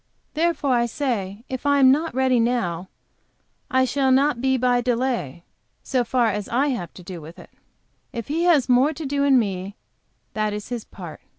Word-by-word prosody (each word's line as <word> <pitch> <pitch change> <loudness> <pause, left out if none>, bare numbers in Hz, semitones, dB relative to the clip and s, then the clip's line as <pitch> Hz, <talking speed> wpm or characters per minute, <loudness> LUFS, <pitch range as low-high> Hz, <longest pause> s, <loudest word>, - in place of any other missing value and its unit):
Therefore 325 -3 0
I 240 -1 +2
say, 225 -6 -3
if 260 -1 -5
I 285 0 +3
am 265 -2 +7
not 310 +1 0
ready 260 -2 +3
now, 190 -7 -1 0.8
I 260 0 +3
shall 270 +1 +1
not 270 -1 +3
be 265 0 +2
by 245 -1 +2
delay, 235 - -2 0.4
so 255 -2 0
far 240 +1 +1
as 205 -1 -3
I 270 +5 +1
have 180 - -3
to 180 - -11
do 175 -1 -8
with 160 +3 -12
it. - - -14 0.6
If 230 -2 -6
He 330 +4 0
has 305 -8 +4
more 260 +5 +4
to 315 +1 -7
do 280 +1 0
in 275 -2 +5
me 195 -3 -2 0.6
that 215 -1 -1
is 210 0 -6
His 240 -3 -4
part. 175 -5 -10
250 Hz, 190 wpm, -23 LUFS, 210-270 Hz, 0.8 s, am